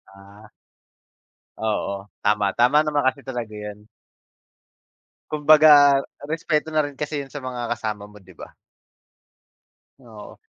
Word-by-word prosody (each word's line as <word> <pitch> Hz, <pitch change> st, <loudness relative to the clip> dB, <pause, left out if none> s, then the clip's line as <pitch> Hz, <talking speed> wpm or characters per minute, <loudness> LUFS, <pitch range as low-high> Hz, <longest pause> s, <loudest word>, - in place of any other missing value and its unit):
Ah. 100 Hz, +2 st, -17 dB, 1.1 s
Oo. 100 Hz, -2 st, -3 dB
Tama, 105 Hz, -1 st, +2 dB
tama 125 Hz, +6 st, +4 dB
naman 150 Hz, -3 st, -1 dB
kasi 135 Hz, +2 st, 0 dB
talaga 120 Hz, -5 st, -6 dB
yun. 105 Hz, 0 st, -9 dB, 1.4 s
Kumbaga 150 Hz, -2 st, +6 dB, 0.3 s
respeto 160 Hz, -1 st, -1 dB
na 155 Hz, -1 st, +1 dB
rin 145 Hz, -1 st, -8 dB
kasi 150 Hz, -1 st, -3 dB
yun 135 Hz, -, -19 dB
sa 145 Hz, -, -6 dB
mga 125 Hz, -2 st, -4 dB
kasama 105 Hz, -3 st, -4 dB
mo, 105 Hz, 0 st, -15 dB
di 95 Hz, -2 st, -19 dB
ba? -, -, -12 dB, 1.4 s
Oo. 115 Hz, -5 st, -13 dB
125 Hz, 120 wpm, -22 LUFS, 105-145 Hz, 1.4 s, Kumbaga